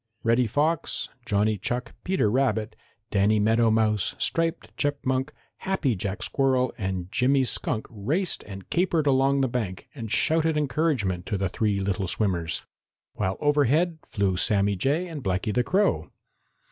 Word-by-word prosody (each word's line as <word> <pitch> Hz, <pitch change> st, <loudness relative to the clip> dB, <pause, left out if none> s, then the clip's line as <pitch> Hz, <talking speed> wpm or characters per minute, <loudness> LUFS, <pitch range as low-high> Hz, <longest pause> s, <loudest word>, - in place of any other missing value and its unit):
Reddy 115 Hz, +1 st, +3 dB
Fox, 150 Hz, +7 st, 0 dB, 0.2 s
Johnny 105 Hz, 0 st, +1 dB
Chuck, 125 Hz, +5 st, -3 dB
Peter 185 Hz, -, +1 dB
Rabbit, 115 Hz, -4 st, 0 dB, 0.4 s
Danny 105 Hz, +1 st, +3 dB
Meadow 115 Hz, +2 st, +3 dB
Mouse, 110 Hz, -2 st, +1 dB
Striped 165 Hz, 0 st, -1 dB
Chipmunk, 135 Hz, -2 st, -1 dB, 0.3 s
Happy 180 Hz, -, 0 dB
Jack 95 Hz, +1 st, -3 dB
Squirrel 130 Hz, -2 st, +1 dB
and 95 Hz, -3 st, -4 dB
Jimmy 135 Hz, +2 st, +3 dB
Skunk 110 Hz, -2 st, -1 dB
raced 145 Hz, -, -1 dB
and 95 Hz, -2 st, -9 dB
capered 170 Hz, -3 st, +1 dB
along 135 Hz, 0 st, +3 dB
the 135 Hz, -, +2 dB
bank 110 Hz, -7 st, -4 dB
and 115 Hz, -6 st, -7 dB
shouted 160 Hz, 0 st, +2 dB
encouragement 130 Hz, -, 0 dB
to 105 Hz, -, -1 dB
the 95 Hz, -1 st, -1 dB
three 105 Hz, 0 st, 0 dB
little 95 Hz, -1 st, -1 dB
swimmers, 85 Hz, -4 st, 0 dB, 0.5 s
while 95 Hz, -2 st, -2 dB
over 145 Hz, -1 st, +3 dB
head 160 Hz, +5 st, +1 dB
flew 100 Hz, -3 st, 0 dB
Sammy 100 Hz, +1 st, +2 dB
Jay 145 Hz, -, 0 dB
and 155 Hz, -5 st, -7 dB
Blacky 95 Hz, +2 st, -1 dB
the 125 Hz, -, +2 dB
Crow. 200 Hz, +9 st, +1 dB
120 Hz, 145 wpm, -26 LUFS, 100-145 Hz, 0.5 s, Reddy